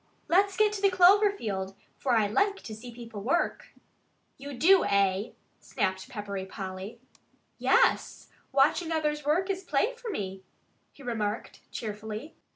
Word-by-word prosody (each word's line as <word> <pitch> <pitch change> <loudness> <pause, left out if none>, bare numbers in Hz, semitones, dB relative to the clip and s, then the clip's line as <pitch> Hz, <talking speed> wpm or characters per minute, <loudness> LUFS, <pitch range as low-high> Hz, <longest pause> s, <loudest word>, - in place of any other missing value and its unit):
"Let's 390 +2 +3
get 425 -1 +4
to 405 - -4
the 400 - +5
clover 385 +3 +6
field, 195 - -4 0.2
for 260 - -1
I 220 -2 +4
like 395 - +1
to 220 - -7
see 240 +3 -9
people 230 -3 -9
work." 280 +11 0 0.7
"You 280 0 -8
do, 370 +6 +6
eh?" 200 +1 +1 0.3
snapped 190 +5 -2
Peppery 205 -5 -5
Polly. 190 +3 -7 0.6
"Yes! - - +2 0.2
Watching 290 +5 +3
others 300 -2 0
work 320 +6 +1
is 380 0 -4
play 355 - +1
for 475 -1 -8
me," 195 - -4 0.5
he 280 - -16
remarked 220 -3 -3
cheerfully. 220 +5 -6
250 Hz, 145 wpm, -28 LUFS, -, 0.7 s, clover